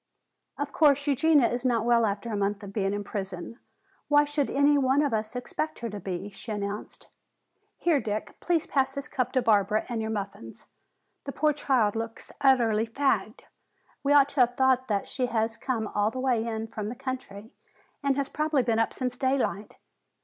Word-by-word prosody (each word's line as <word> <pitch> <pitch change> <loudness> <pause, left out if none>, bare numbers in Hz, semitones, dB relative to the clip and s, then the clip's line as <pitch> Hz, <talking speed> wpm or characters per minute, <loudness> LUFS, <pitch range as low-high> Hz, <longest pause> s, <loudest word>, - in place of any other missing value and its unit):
"Of 285 0 -4
course, 285 -3 +4
Eugenia 290 -2 +4
is 245 +1 -3
not 235 -3 +1
well 235 -2 +4
after 205 +3 -3
a - - -1
month 200 +1 -1
of 200 -1 -8
being 195 -2 0
in 205 0 -3
prison. 195 +2 -6 0.5
Why 295 0 +5
should 290 -1 -1
any 285 +1 +4
one 275 +1 +3
of 285 -5 0
us 220 +2 -2
expect 310 +5 -3
her 230 - -5
to 205 - -6
be?" 190 +2 -5
she 220 +3 -9
announced. 205 0 -5 0.7
"Here, 335 -5 +2
Dick, 210 0 -4
please 340 -3 0
pass 270 -2 0
this 280 +1 -4
cup 255 -1 -2
to 255 -2 +2
Barbara 210 -1 +2
and 235 -2 -2
your 220 - -3
muffins. 200 - -6 0.6
The 280 - -3
poor 305 +2 +2
child 255 -8 +1
looks 225 0 -6
utterly 230 -5 +3
fagged! 275 +4 0 0.6
We 280 - 0
ought 285 -1 +6
to 280 - -4
have 245 -1 +3
thought 260 -1 +3
that 205 -2 -1
she 255 -2 -1
has 225 -1 -1
come 235 -4 -2
all 205 0 0
the 255 - -6
way 245 -3 +1
in 220 -1 -3
from 215 -2 -5
the 240 - -6
country 250 -5 -6 0.5
and 280 -1 +1
has 280 -1 0
probably 305 -3 0
been 230 -2 +1
up 225 - +1
since 250 -1 -3
daylight. 260 -6 -1
240 Hz, 195 wpm, -27 LUFS, 215-275 Hz, 0.7 s, ought